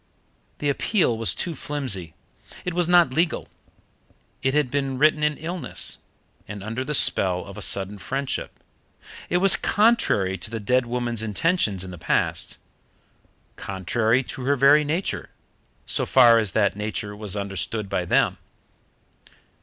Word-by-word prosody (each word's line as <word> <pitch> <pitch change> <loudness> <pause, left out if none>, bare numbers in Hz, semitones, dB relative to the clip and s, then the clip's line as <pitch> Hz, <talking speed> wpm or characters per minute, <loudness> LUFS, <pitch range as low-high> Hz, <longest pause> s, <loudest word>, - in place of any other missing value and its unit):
The 145 - -1
appeal 165 - +1
was 110 -6 0
too 175 - -3
flimsy. 125 - -4 0.5
It 180 - -2
was 175 -1 +1
not 175 -6 +4
legal; 165 +3 0 0.9
it 135 +2 0
had 150 -5 +1
been 135 -2 -1
written 150 +2 +3
in 150 -1 +1
illness, 165 -4 -1 0.5
and 100 -2 -7
under 115 +5 -4
the 150 +3 -1
spell 90 -8 +2
of 100 - -10
a - - -8
sudden 100 +1 -2
friendship; 135 +7 -4 0.7
it 175 - +2
was 190 0 +6
contrary 190 - +2
to - - -3
the 115 0 -4
dead 125 +4 +1
woman's 120 -2 -2
intentions 110 - 0
in 95 - -8
the 90 - -10
past, - - -1 1.0
contrary 110 +6 0
to 125 0 -6
her 140 +1 +2
very 140 +3 +5
nature, 160 +6 -3 0.6
so - - 0
far 120 -3 +6
as 105 -4 -1
that 105 -3 +2
nature 105 0 -4
was 105 -2 -5
understood 100 +1 -3
by 90 - -1
them. 90 - +1
125 Hz, 145 wpm, -23 LUFS, 105-150 Hz, 1.0 s, was